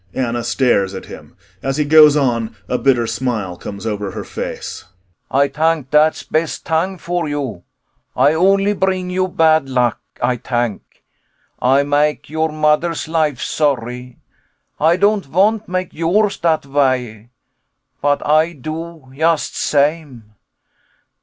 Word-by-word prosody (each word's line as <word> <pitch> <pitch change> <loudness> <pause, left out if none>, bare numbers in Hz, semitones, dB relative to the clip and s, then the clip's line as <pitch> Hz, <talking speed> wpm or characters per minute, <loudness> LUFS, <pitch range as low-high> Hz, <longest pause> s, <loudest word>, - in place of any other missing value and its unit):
[ANNA 120 -2 -1
stares 100 -9 +1
at 95 - -7
him. - - -13 0.2
As 135 +1 -2
he 150 - +1
goes 150 0 +7
on, 115 -6 0
a 125 - -1
bitter 125 -4 +2
smile 115 -6 -3
comes 100 +4 -8
over 105 -2 -3
her 95 - -6
face.] - - -6 0.5
Ay 140 +1 +3
tank 155 -1 -1
dat's 150 +1 +3
best 160 0 -2
tang 175 +4 0
for 175 -2 -3
you. 135 -11 -4 0.6
Ay 140 +4 +4
only 195 +4 +3
bring 185 -2 -1
you 185 0 0
bad 160 -5 +2
luck, 125 -3 +1 0.2
Ay 125 0 0
tank. 120 -3 -4 0.6
Ay 135 +3 +3
make 145 +1 0
your 160 0 0
mo'der's 155 +2 0
life 155 -5 0
sorry. 125 -4 -2 0.6
Ay 160 +3 +4
don't 200 +1 +2
vant 205 +8 +1
make 185 0 -3
yours 195 +6 +1
dat 160 -4 +1
way, 130 -5 -1 0.7
but 145 0 +1
Ay 155 +3 +3
do 160 +1 -7
yust 160 +3 0
same. 140 -7 -1
150 Hz, 135 wpm, -18 LUFS, 125-165 Hz, 0.7 s, goes